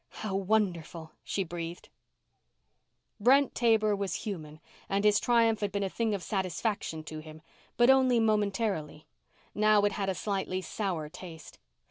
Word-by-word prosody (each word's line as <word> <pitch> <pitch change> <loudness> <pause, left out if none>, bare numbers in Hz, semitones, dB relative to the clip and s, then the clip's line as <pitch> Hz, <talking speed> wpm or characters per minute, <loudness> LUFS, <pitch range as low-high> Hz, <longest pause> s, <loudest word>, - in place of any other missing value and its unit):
"How 205 - -2
wonderful," 180 -5 -1
she 195 - -2
breathed. 170 0 -7 1.3
Brent 265 +5 +4
Taber 220 -3 +3
was 200 -1 -2
human 155 -7 -6 0.3
and 200 +1 0
his 210 -1 +5
triumph 230 -2 +3
had 205 -1 -2
been 200 +1 -1
a 190 - -2
thing 225 -3 0
of 190 - -6
satisfaction 190 -3 -2
to 155 0 -7
him 155 0 -12 0.3
but 240 +2 +6
only 260 -2 +4
momentarily. 205 -8 0 0.5
Now 215 0 +4
it 205 - +3
had 195 -1 -2
a 190 - -1
slightly 190 -1 -2
sour 185 -5 -3
taste. 160 0 -11
200 Hz, 145 wpm, -29 LUFS, 170-215 Hz, 1.3 s, but